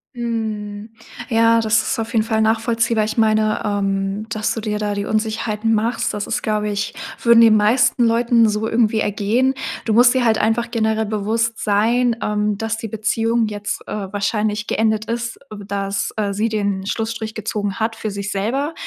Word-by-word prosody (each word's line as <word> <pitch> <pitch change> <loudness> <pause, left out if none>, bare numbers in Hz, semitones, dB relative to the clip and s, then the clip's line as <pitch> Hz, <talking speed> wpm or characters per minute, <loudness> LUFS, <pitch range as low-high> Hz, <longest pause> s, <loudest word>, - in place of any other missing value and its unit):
Mhm. 220 -3 -4 0.4
Ja, 230 0 +4
das 220 0 +3
ist - - -2
auf 225 +1 -3
jeden 220 -1 +2
Fall 220 -1 0
nachvollziehbar. 225 0 +1
Ich 220 - -4
meine, 215 -1 +2
ähm, 195 0 -1
dass 215 -1 -1
du 225 - -4
dir 210 -1 -2
da 210 -1 -2
die 200 0 -3
Unsicherheiten 220 0 -1
machst, 230 +2 0
das 205 -1 -4
ist - - -1
glaube 210 -1 0
ich 205 0 -2 0.3
würden 235 -1 +6
den 225 -2 +7
meisten 240 +3 +3
Leuten 230 -1 +3
so 210 +1 -1
irgendwie 225 -1 +2
ergehen. 220 +7 +1 0.3
Du 220 - +1
musst 245 +2 +6
dir 255 -2 +1
halt 220 -1 +3
einfach 225 +2 0
generell 220 -1 0
bewusst 220 +2 -1
sein, 230 +3 +2
ähm, 210 -1 0
dass 225 0 -2
die 225 -1 -6
Beziehung 225 +1 0
jetzt, 205 -1 -5
äh, 195 -2 -5
wahrscheinlich 210 +1 -1
geendet 220 -1 0
ist, 230 0 -4
dass, 200 -1 -3
äh, 200 -2 -1
sie 220 +3 0
den 200 -3 -1
Schlussstrich 220 +1 -3
gezogen 210 -1 -3
hat 225 +1 -1
für 220 -2 -4
sich 200 +1 -4
selber, 265 +11 -1
220 Hz, 180 wpm, -20 LUFS, 210-230 Hz, 0.4 s, den